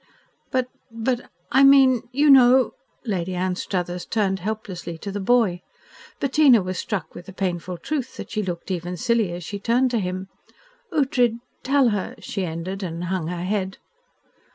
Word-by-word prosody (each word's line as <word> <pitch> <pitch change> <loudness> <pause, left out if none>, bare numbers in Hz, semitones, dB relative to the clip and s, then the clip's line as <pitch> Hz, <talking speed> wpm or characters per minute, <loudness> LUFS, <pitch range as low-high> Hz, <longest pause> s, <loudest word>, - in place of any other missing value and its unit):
"But 255 -1 0 0.2
but 235 +2 -2 0.2
I 265 +2 +5
mean 270 -3 +6
you 285 +3 +4
know 260 -1 +6 0.2
" - - -40
Lady 180 +1 -3
Anstruthers 180 -1 -2
turned 195 -4 0
helplessly 185 -4 -5
to 200 +4 -6
the 205 - -4
boy. 200 -4 +2 0.6
Bettina 270 -6 +5
was 185 0 -4
struck 205 -4 -4
with 175 - -11
the 190 - -9
painful 180 -2 -3
truth 265 - -4
that - - -8
she 215 - -1
looked 180 -1 -5
even 180 0 -3
silly 235 -5 +1
as 175 0 -6
she 200 +5 -5
turned 240 +4 +2
to 235 - +1
him. 185 0 -3 0.6
"Ughtred 250 -6 +2 0.2
tell 270 -2 +3
her," 205 -3 -3
she 195 - -4
ended, 180 +3 -4
and 170 -2 -4
hung 180 -2 -2
her 175 0 -4
head. 190 0 -2
200 Hz, 165 wpm, -23 LUFS, 180-245 Hz, 0.6 s, mean